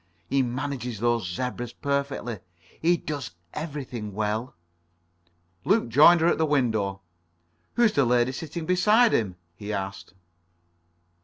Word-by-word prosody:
He 135 +8 +2
manages 125 -2 -3
those 115 -4 +1
zebras 120 +4 -4
perfectly. 140 -5 -2 0.4
He 170 +2 +3
does 145 - -5 0.2
everything 130 - -5
well." 110 +3 -2 1.1
Luke 205 +4 +3
had - - -9
joined 160 +7 +7
her 165 - +4
at 175 - +2
the 160 - +3
window. 110 -9 0 0.7
"Who's 235 -3 +4
the 140 - +3
lady 120 0 +2
sitting 160 +4 -6
beside 210 +7 +4
him?" 95 -5 0 0.2
he 105 +3 -6
asked. 95 -2 -5
125 Hz, 130 wpm, -26 LUFS, 110-155 Hz, 1.1 s, joined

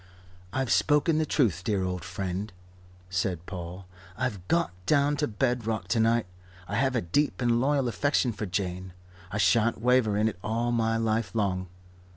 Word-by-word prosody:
"I've 130 -2 -1
spoken 155 +1 +3
the 155 - 0
Truth, 100 - +1
dear 100 -1 0
old 90 -2 -3
friend," 95 +4 -4 0.6
said 90 -2 -1
Paul. 90 0 -7 0.3
"I've 105 -8 -3
got 170 0 +2 0.2
down 145 0 +3
to 150 0 +1
bed 120 +1 -1
rock 110 -1 -2
to 115 - +2
night. 115 +1 +3 0.4
I - - -6
have 130 +1 +1
a 120 - +2
deep 145 - 0
and 120 -1 +2
loyal 140 -1 +2
affection 125 +1 +1
for 105 0 -4
Jane. 90 0 -3 0.4
I 100 - -2
shan't 115 +2 +3
waver 120 -3 +3
in 105 +1 +3
it 100 -5 -4
all 115 +2 0
my 115 -1 +1
life 115 0 -1
long. 95 -4 0
110 Hz, 175 wpm, -28 LUFS, 95-125 Hz, 0.6 s, spoken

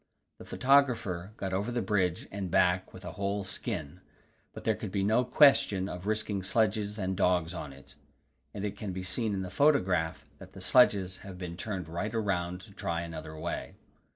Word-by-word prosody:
The - - -10
photographer 120 -9 +2
got 95 -1 -3
over 100 +5 -1
the 120 -2 -1
bridge 95 -4 0
and 95 -2 -4
back 90 +1 +2
with - - -12
a - - -5
whole 100 0 -2
skin, 90 -2 -4 0.5
but - - -10
there - - +2
could - - -6
be 100 0 0
no 110 +5 +3
question 125 -8 +5
of 90 0 -6
risking 105 -2 0
sledges 105 +1 +1
and 95 -2 -1
dogs 90 -2 +2
on 80 -5 -6
it, 70 0 -15 0.6
and 100 +4 -4
it 100 -1 -3
can 100 -2 -5
be 95 0 -4
seen 110 +4 -1
in 95 - -2
the 90 - -6
photograph 95 - +2
that - - -12
the - - -10
sledges 95 -7 +4
have 95 -2 -9
been 90 -2 -6
turned 95 -1 -4
right 95 +7 -3
round 90 -4 -1
to 105 - -13
try 85 -3 -3
another 80 -2 -7
way. - - -4
95 Hz, 190 wpm, -30 LUFS, 90-105 Hz, 0.6 s, question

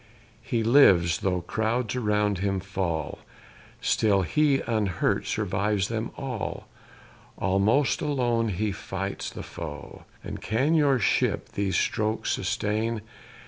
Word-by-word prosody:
He 115 -2 -1
lives 95 - +5
though 90 -2 0
crowds 110 +6 -1
around 105 -4 +1
him 95 0 0
fall, 90 -5 -3 0.6
Still 100 -3 +2
he, 140 - +2
unhurt, 105 -7 0
survives 100 0 0
them 115 0 -2
all; 130 -6 -4 0.7
Almost 100 +9 +2
alone 120 -6 +1
he 105 +2 -1
fights 95 0 -4
the - - -8
foe. - - -8 0.2
And - - -6
can 130 +9 +1
your 145 -4 +4
ship - - +1
these 100 -2 -2
strokes 110 +1 0
sustain? 110 +1 -1
105 Hz, 115 wpm, -26 LUFS, 95-120 Hz, 0.7 s, lives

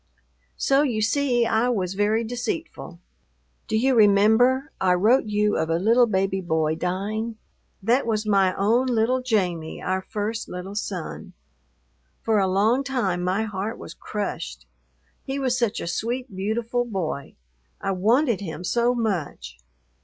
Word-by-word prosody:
So 275 +1 +3
you 250 -7 0
see 240 0 +2
I 230 +2 +2
was 190 -6 -1
very 210 +3 +1
deceitful. 245 - -5 0.7
Do 220 - 0
you 260 +4 +3
remember, 225 +6 +4
I 180 -1 +4
wrote 220 +9 +3
you 210 0 +1
of 160 0 -1
a 165 - +2
little 230 +6 +4
baby 190 -2 0
boy 160 -3 0
dying? 205 +7 -3 0.5
That 235 +5 +2
was 215 -1 0
my 195 -3 +3
own 230 +6 +2
little 245 +1 +1
Jamie, 180 -10 -1
our 190 +1 -1
first 215 +3 -4
little 180 +2 -6
son. 210 - -5 0.9
For 220 -2 +2
a 190 - +2
long 215 +8 +2
time 225 -10 -1
my 185 +4 0
heart 210 0 -4
was 160 - -9
crushed. 60 - -5 0.6
He 270 +1 -4
was 260 -2 0
such 235 -5 0
a - - -4
sweet, 235 +5 -3
beautiful 230 +5 -1
boy. 185 - -4 0.4
I 195 - -2
wanted 225 +4 +2
him 175 -2 -6
so 235 +6 +1
much. 160 - -3
215 Hz, 145 wpm, -24 LUFS, 190-240 Hz, 0.9 s, remember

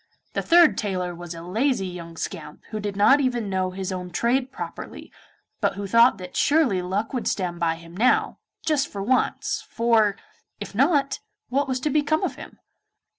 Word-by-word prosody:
The - - 0
third 340 -1 +5
tailor 185 -4 -2
was 175 0 -8
a 165 - -8
lazy 220 +4 0
young 170 -2 -8
scamp 150 - -6
who 215 - -3
did 205 -1 -4
not 270 +8 +5
even 240 -6 -1
know 185 -1 0
his 190 +1 -5
own 180 -1 -4
trade 250 +7 0
properly, - - -8 0.5
but - - 0
who 200 0 -4
thought 230 +5 +5
that 180 -1 -9
surely 285 - +3
luck 195 +7 -2
would 250 - -2
stand 175 -3 -2
by 165 -1 +1
him 165 +1 -13
now, 235 +7 +2 0.3
just 300 -3 +2
for 200 -1 -5
once, 250 +4 0
for, 225 -3 +2 0.4
if 205 - -7
not, 275 - +2 0.3
what 275 +2 +1
was 260 -1 -1
to 300 - 0
become 305 +2 +1
of - - -1
him? - - -11
210 Hz, 180 wpm, -24 LUFS, 180-260 Hz, 0.5 s, third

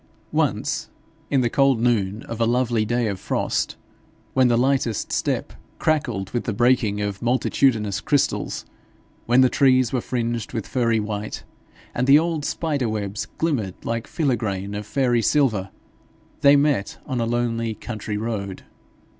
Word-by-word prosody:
Once, - - 0 0.4
in 135 -2 +3
the 120 - +2
cold 135 -4 +3
noon 110 -3 +1
of 115 0 -6
a 115 - +3
lovely 120 -2 +1
day 120 +2 0
of 100 -3 -2
frost, - - -1 0.6
when 130 -1 +4
the 120 -1 +3
lightest 125 -3 0
step - - -1 0.2
crackled 125 -11 0
with 120 - -2
the 115 - -1
breaking 120 -3 +2
of 100 -1 -3
multitudinous 120 -4 +1
crystals, 145 -2 0 0.6
when 120 +2 +5
the 130 - +6
trees 130 -3 +3
were 125 - +1
fringed 120 -2 -3
with 115 -4 -3
furry 115 -3 +1
white, 105 0 -4 0.5
and 125 +2 0
the 140 +2 +8
old 160 -1 0
spider 145 -7 -1
webs 105 -1 -3
glimmered 125 - -1
like 115 0 -2
filigrane 110 - -1
of 105 0 -5
fairy 125 -2 +2
silver, 110 -7 +2 0.7
they 140 0 +6
met 140 -8 +1
on 130 -4 -2
a - - +1
lonely 115 -1 -1
country 110 -3 -5
road. 105 -4 -4
120 Hz, 150 wpm, -23 LUFS, 105-130 Hz, 0.7 s, the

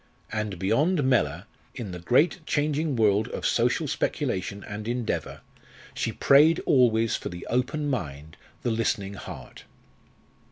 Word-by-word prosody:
And 105 -3 -3
beyond 145 - +2
Mellor, 95 - +1 0.3
in 115 -7 -5
the 90 - -6
great 130 - +2
changing 150 0 0
world 105 -2 +3
of - - -5
social - - +1
speculation 100 +2 -2
and 105 +1 -7
endeavour, 120 -1 -3 0.5
she - - -2
prayed 155 +4 +5
always 115 -4 +3
for - - -4
the 85 0 -8
open 125 +5 0
mind, 80 - -4 0.3
the 120 - 0
listening 100 -3 -1
heart. - - -10
115 Hz, 130 wpm, -26 LUFS, 100-140 Hz, 0.5 s, prayed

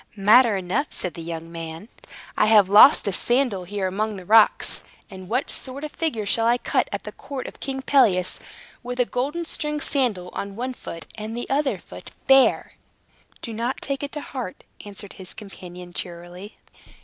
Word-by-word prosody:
"Matter 215 +2 +5
enough," 190 +11 -1
said 180 - -4
the 170 - -8
young 165 0 -6
man. 165 +3 -7 0.5
"I - - +3
have 210 -3 +6
lost 210 +3 +8
a 200 - 0
sandal 240 -5 +1
here 200 +1 -3
among 210 +3 -1
the 185 -2 -9
rocks. 220 +2 +4 0.3
And 190 -1 -10
what 250 +5 -1
sort 270 +2 -7
of 305 - -6
a - - -21
figure 260 -11 -1
shall 225 +3 +1
I 240 +1 +4
cut, - - 0
at - - -4
the - - -7
court 270 -3 -7
of - - -9
King 265 -1 -4
Pelias, 195 -12 +3 0.4
with 245 0 -6
a 245 - +4
golden 285 +9 -2
stringed 300 -2 -2
sandal 220 - 0
on 200 0 -5
one 255 +3 -3
foot, 165 -8 -9
and 220 +2 -5
the 240 - -4
other 280 0 +1
foot - - -12 0.2
bare!" 270 -1 +4 0.7
"Do 230 - -5
not 235 +4 -2
take 275 -1 -3
it 285 -1 -4
to 295 - -4
heart," 250 -11 -6 0.2
answered 205 -1 -5
his 190 -1 -11
companion 180 -4 -10
cheerily. 175 +3 -7
215 Hz, 185 wpm, -24 LUFS, 185-260 Hz, 0.7 s, lost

